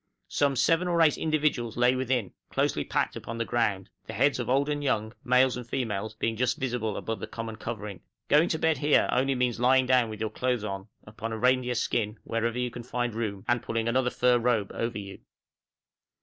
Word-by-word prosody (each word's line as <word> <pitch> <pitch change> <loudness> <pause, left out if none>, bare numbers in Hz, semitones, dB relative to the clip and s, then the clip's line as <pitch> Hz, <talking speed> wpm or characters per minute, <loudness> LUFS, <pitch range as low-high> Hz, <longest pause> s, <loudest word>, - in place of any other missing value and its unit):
Some 140 -1 +1
seven 165 +7 +2
or 170 -1 +1
eight 155 - +4
individuals 150 -8 0
lay 125 +1 +4
within, 130 -5 -1 0.2
closely - - 0
packed - - -1
upon 115 - -6
the 115 - -1
ground; 110 -6 0 0.2
the - - -6
heads 135 +1 +2
of 120 - -3
old 135 +2 +2
and 145 -1 -2
young, 110 -5 0
males 125 0 +4
and 120 -1 -7
females, 110 -4 -2
being 115 +1 -1
just 125 +3 0
visible 120 -5 -2
above 115 -2 -4
the - - -5
common 115 -1 -6
covering. 105 -4 -6 0.3
Going 150 +4 +4
to 160 - 0
bed 160 -3 +1
here, 145 +1 +3
only 135 +1 +2
means 125 -2 0
lying 130 +1 +4
down 125 -2 +3
with 110 - -7
your 110 0 -2
clothes 125 -1 -1
on, 100 -1 -5 0.2
upon 110 +2 -6
a - - -3
reindeer 125 +1 +2
skin, 115 -2 -1
wherever 115 +1 -1
you 125 -1 -1
can 120 - -7
find 120 -1 -2
room, 105 -4 -4
and 120 -1 +2
pulling 115 0 -2
another 125 +1 +2
fur 125 0 +3
robe 115 -4 +1
over 115 0 -2
you. 100 -1 -8
120 Hz, 205 wpm, -28 LUFS, 110-130 Hz, 0.3 s, eight